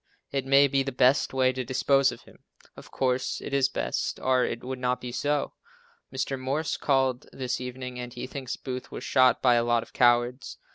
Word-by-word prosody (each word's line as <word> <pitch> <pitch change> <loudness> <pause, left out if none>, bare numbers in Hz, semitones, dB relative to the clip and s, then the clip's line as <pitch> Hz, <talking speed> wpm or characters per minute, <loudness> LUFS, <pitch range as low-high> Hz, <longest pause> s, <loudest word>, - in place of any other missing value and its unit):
It 135 -1 -2
may 140 +1 +6
be 135 0 +1
the 135 0 -3
best 125 +2 +3
way 130 -1 +2
to 130 0 -3
dispose 135 +2 +2
of - - -11
him. - - -19 0.4
Of - - -13
course, 130 -1 -1
it - - -7
is 135 -1 +3
best, - - -3
or 130 -1 +2
it 120 - -3
would 130 0 -5
not 125 -1 0
be 125 -1 -6
so. 145 +3 -1 0.6
Mr. 130 0 -3
Morse 140 +5 -2
called 130 -3 0
this 130 -1 -3
evening 125 0 -6
and 125 0 -6
he 120 - -6
thinks 135 -3 -5
Booth 130 -1 -6
was - - -7
shot 130 -1 +3
by 125 -2 +5
a 120 -1 +3
lot 120 -1 +1
of - - -18
cowards. 120 +1 +2
130 Hz, 205 wpm, -27 LUFS, 125-135 Hz, 0.6 s, may